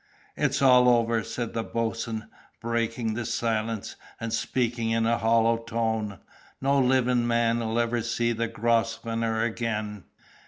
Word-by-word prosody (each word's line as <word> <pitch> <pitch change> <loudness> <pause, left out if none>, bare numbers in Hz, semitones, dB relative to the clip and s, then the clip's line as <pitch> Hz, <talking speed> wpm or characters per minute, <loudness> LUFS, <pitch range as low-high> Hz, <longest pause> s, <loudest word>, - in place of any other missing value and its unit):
"It's - - 0
all 125 -1 +6
over!" 115 -1 +3
said 120 +1 -4
the 115 - -1
boatswain, 115 -1 -3 0.3
breaking 115 -1 -1
the 120 +2 -3
silence, 110 -2 -2 0.2
and 115 -1 -4
speaking 115 0 -1
in 115 0 +1
a 115 +1 +2
hollow 115 0 +3
tone. 110 -3 -2 0.4
"No 140 +1 +2
livin' 125 -2 +2
man'll 115 -1 +1
ever 120 0 +1
see 115 +1 0
the 115 0 -1
Grosvenor 115 0 0
again!" 110 -3 -3
115 Hz, 130 wpm, -26 LUFS, 115-120 Hz, 0.4 s, all